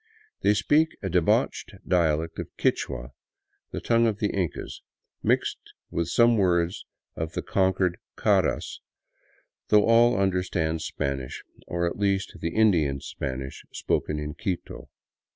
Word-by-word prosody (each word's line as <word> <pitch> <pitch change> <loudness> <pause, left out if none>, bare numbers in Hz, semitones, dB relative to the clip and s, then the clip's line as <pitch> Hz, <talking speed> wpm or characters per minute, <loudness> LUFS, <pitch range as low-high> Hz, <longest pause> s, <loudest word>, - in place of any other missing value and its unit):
They 105 - +4
speak 150 +11 +2
a 95 - -1
debauched 85 -2 +1
dialect 80 -2 +1
of - - -5
Quichua, - - -1 0.6
the - - -4
tongue 115 0 +3
of 105 -2 0
the 105 -1 0
Incas, 95 -4 -3 0.4
mixed - - +1 0.3
with 85 -1 -1
some 115 +6 +4
words 90 0 +1 0.3
of 80 0 -4
the - - -3
conquered 95 -2 +1 0.2
Caras, - - +1 0.9
though 105 -1 +5
all 115 0 +5
understand 90 -4 0
Spanish, 70 -4 -4 0.2
or 85 0 -1
at 85 - -3
least 100 -1 0
the 85 - -1
Indian 85 -11 +3
Spanish 65 -1 -5
spoken 75 - -1
in 75 0 -4
Quito. 95 -2 -5
90 Hz, 130 wpm, -26 LUFS, 80-105 Hz, 0.9 s, though